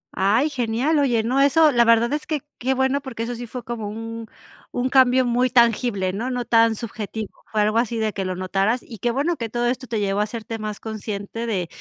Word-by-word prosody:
Ay, 220 Hz, +10 st, +2 dB
genial. 255 Hz, +4 st, 0 dB
Oye, 240 Hz, -6 st, +2 dB
no, 255 Hz, +4 st, +1 dB
eso, 305 Hz, +2 st, +5 dB
la 240 Hz, -2 st, +4 dB
verdad 230 Hz, +2 st, +4 dB
es 300 Hz, -, -3 dB
que 305 Hz, -3 st, -1 dB, 0.2 s
qué 260 Hz, +2 st, 0 dB
bueno, 265 Hz, +2 st, +1 dB
porque 245 Hz, -5 st, -5 dB
eso 245 Hz, -, -3 dB
sí 240 Hz, 0 st, -7 dB
fue 250 Hz, +1 st, -7 dB
como 225 Hz, -3 st, -5 dB
un 225 Hz, +1 st, -6 dB, 0.4 s
un 250 Hz, +1 st, -1 dB
cambio 260 Hz, -1 st, +5 dB
muy 245 Hz, +1 st, +2 dB
tangible, 230 Hz, -5 st, +2 dB
¿no? 230 Hz, +6 st, -3 dB
No 250 Hz, -1 st, -2 dB
tan 230 Hz, -1 st, +4 dB
subjetivo. 215 Hz, -1 st, -5 dB, 0.2 s
Fue 215 Hz, -1 st, +1 dB
algo 215 Hz, +2 st, +2 dB
así 235 Hz, -1 st, -1 dB
de 220 Hz, -1 st, 0 dB
que 195 Hz, -, -3 dB
lo 185 Hz, -1 st, -2 dB
notaras, 195 Hz, +6 st, 0 dB
y 225 Hz, -5 st, -11 dB
qué 240 Hz, -, 0 dB
bueno 300 Hz, +7 st, 0 dB
que 230 Hz, -2 st, -4 dB
todo 240 Hz, +1 st, -1 dB
esto 255 Hz, +1 st, -2 dB
te 225 Hz, -1 st, -2 dB
llevó 200 Hz, 0 st, 0 dB
a 210 Hz, -, +3 dB
hacerte 225 Hz, +1 st, -5 dB
más 215 Hz, -1 st, -5 dB
consciente 220 Hz, +1 st, -5 dB
de, 185 Hz, -6 st, -1 dB
230 Hz, 230 wpm, -22 LUFS, 215-255 Hz, 0.4 s, eso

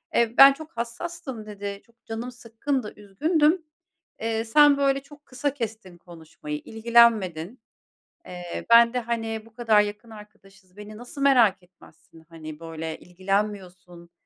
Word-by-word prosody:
eee, 235 Hz, -1 st, +2 dB
ben 275 Hz, 0 st, +10 dB
çok 315 Hz, +2 st, -12 dB
hassastım.” 255 Hz, 0 st, -6 dB
dedi, 200 Hz, -1 st, -7 dB
“Çok 235 Hz, -1 st, -32 dB
canım 230 Hz, +3 st, -6 dB
sıkkındı, 240 Hz, 0 st, -4 dB
üzgündüm. 305 Hz, -, +1 dB, 0.6 s
Eee, 225 Hz, 0 st, -2 dB
sen, 290 Hz, +4 st, +5 dB
böyle, 275 Hz, -1 st, +2 dB
çok 290 Hz, +1 st, -17 dB
kısa 270 Hz, +2 st, -3 dB
kestin 220 Hz, -8 st, -7 dB
konuşmayı, 160 Hz, -3 st, -9 dB
ilgilenmedin. 225 Hz, -4 st, +2 dB, 0.7 s
Eee, 175 Hz, -1 st, -7 dB
ben 235 Hz, 0 st, +7 dB
de, 250 Hz, -, 0 dB
hani, 225 Hz, -1 st, -4 dB
bu 225 Hz, -, -20 dB
kadar 220 Hz, -3 st, +3 dB
yakın 210 Hz, +2 st, -4 dB
arkadaşız, 195 Hz, -3 st, -16 dB
beni 210 Hz, +1 st, -10 dB
nasıl 245 Hz, +4 st, -9 dB
merak 240 Hz, -9 st, +4 dB
etmezsin? 170 Hz, -2 st, -20 dB
Hani, 155 Hz, -2 st, -10 dB
böyle 160 Hz, -1 st, -6 dB
ilgilenmiyorsun, 185 Hz, -2 st, -4 dB
220 Hz, 135 wpm, -25 LUFS, 185-245 Hz, 0.7 s, ben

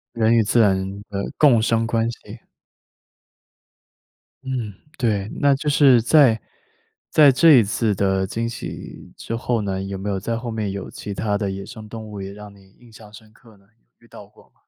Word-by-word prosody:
人 115 Hz, 0 st, +2 dB
与 115 Hz, -, +4 dB
自 110 Hz, +2 st, +2 dB
然 100 Hz, -3 st, +3 dB, 0.3 s
的 100 Hz, -1 st, -4 dB
共 130 Hz, -7 st, +5 dB
生 115 Hz, 0 st, +1 dB
关 115 Hz, 0 st, 0 dB
系。 115 Hz, -1 st, -10 dB, 2.0 s
嗯， 125 Hz, -6 st, -4 dB, 0.2 s
对， 105 Hz, -5 st, -1 dB
那 140 Hz, -1 st, +3 dB
就 150 Hz, +2 st, -3 dB
是 135 Hz, -5 st, +5 dB
在 125 Hz, -3 st, +4 dB, 0.7 s
在 145 Hz, -3 st, +6 dB
这 160 Hz, +4 st, +6 dB
一 120 Hz, -4 st, +7 dB
次 105 Hz, 0 st, -1 dB
的 95 Hz, -1 st, 0 dB
惊 115 Hz, +4 st, -3 dB
喜 -, -, -9 dB
之 115 Hz, -, -5 dB
后 120 Hz, -1 st, -1 dB
呢， 95 Hz, -2 st, -3 dB
有 95 Hz, 0 st, -5 dB
没 100 Hz, +2 st, -5 dB
有 95 Hz, -, -2 dB
在 115 Hz, +4 st, -3 dB
后 120 Hz, -1 st, -6 dB
面 105 Hz, -3 st, -3 dB
有 100 Hz, -1 st, -6 dB
其 100 Hz, -, -7 dB
它 105 Hz, 0 st, -1 dB
的 100 Hz, -2 st, -2 dB
野 95 Hz, 0 st, -6 dB
生 110 Hz, -1 st, -11 dB
动 110 Hz, 0 st, -8 dB
物 100 Hz, -2 st, -8 dB
也 95 Hz, 0 st, -7 dB
让 105 Hz, 0 st, -12 dB
你 95 Hz, -1 st, -21 dB
印 120 Hz, -1 st, -19 dB
象 110 Hz, -1 st, -15 dB
深 110 Hz, 0 st, -15 dB
刻 115 Hz, -3 st, -20 dB
呢？ 100 Hz, -, -27 dB, 0.3 s
遇 -, -, -22 dB
到 -, -, -13 dB
过 -, -, -22 dB
吗？ -, -, -40 dB
110 Hz, 210 characters per minute, -21 LUFS, 100-120 Hz, 2.0 s, 一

